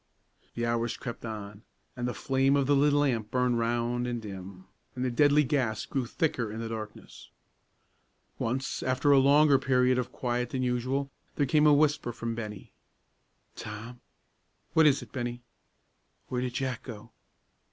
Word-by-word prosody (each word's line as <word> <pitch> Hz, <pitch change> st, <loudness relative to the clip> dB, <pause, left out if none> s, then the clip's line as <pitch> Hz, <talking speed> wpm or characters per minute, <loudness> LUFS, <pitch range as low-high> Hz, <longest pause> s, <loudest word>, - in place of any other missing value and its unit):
The 120 Hz, -, -1 dB
hours 115 Hz, 0 st, -1 dB
crept 120 Hz, -3 st, -7 dB
on, 105 Hz, -2 st, -7 dB, 0.3 s
and 125 Hz, -1 st, -2 dB
the 125 Hz, -, -3 dB
flame 135 Hz, +1 st, +2 dB
of 140 Hz, -1 st, +2 dB
the 145 Hz, +1 st, +3 dB
little 145 Hz, +1 st, +4 dB
lamp 115 Hz, -7 st, 0 dB
burned 125 Hz, -1 st, +1 dB
round 120 Hz, +1 st, 0 dB
and 120 Hz, -1 st, -2 dB
dim, 95 Hz, -3 st, -9 dB, 0.3 s
and 125 Hz, 0 st, -2 dB
the 125 Hz, -, 0 dB
deadly 145 Hz, +4 st, +4 dB
gas 130 Hz, -6 st, -1 dB
grew 130 Hz, -3 st, -2 dB
thicker 125 Hz, -6 st, -1 dB
in 110 Hz, -, -6 dB
the 115 Hz, 0 st, -4 dB
darkness. 110 Hz, -1 st, -8 dB, 1.1 s
Once, 130 Hz, +4 st, -2 dB
after 130 Hz, +3 st, +2 dB
a 140 Hz, -, +7 dB
longer 140 Hz, +1 st, +5 dB
period 125 Hz, -1 st, +2 dB
of 125 Hz, -, -3 dB
quiet 125 Hz, -1 st, -2 dB
than 130 Hz, -1 st, -2 dB
usual, 130 Hz, +3 st, -1 dB, 0.2 s
there 145 Hz, -, +2 dB
came 150 Hz, +3 st, +4 dB
a -, -, +7 dB
whisper 145 Hz, -4 st, +2 dB
from 115 Hz, 0 st, -4 dB
Bennie. 105 Hz, -4 st, -7 dB, 0.8 s
"Tom!" 110 Hz, +4 st, -8 dB, 0.7 s
"What 160 Hz, -1 st, +6 dB
is 140 Hz, -2 st, +3 dB
it, -, -, -15 dB
Bennie?" 120 Hz, -2 st, -4 dB, 0.9 s
"Where 125 Hz, -1 st, -1 dB
did 125 Hz, -1 st, -3 dB
Jack 130 Hz, -3 st, -2 dB
go?" 115 Hz, -1 st, -10 dB
125 Hz, 165 wpm, -29 LUFS, 115-135 Hz, 1.1 s, a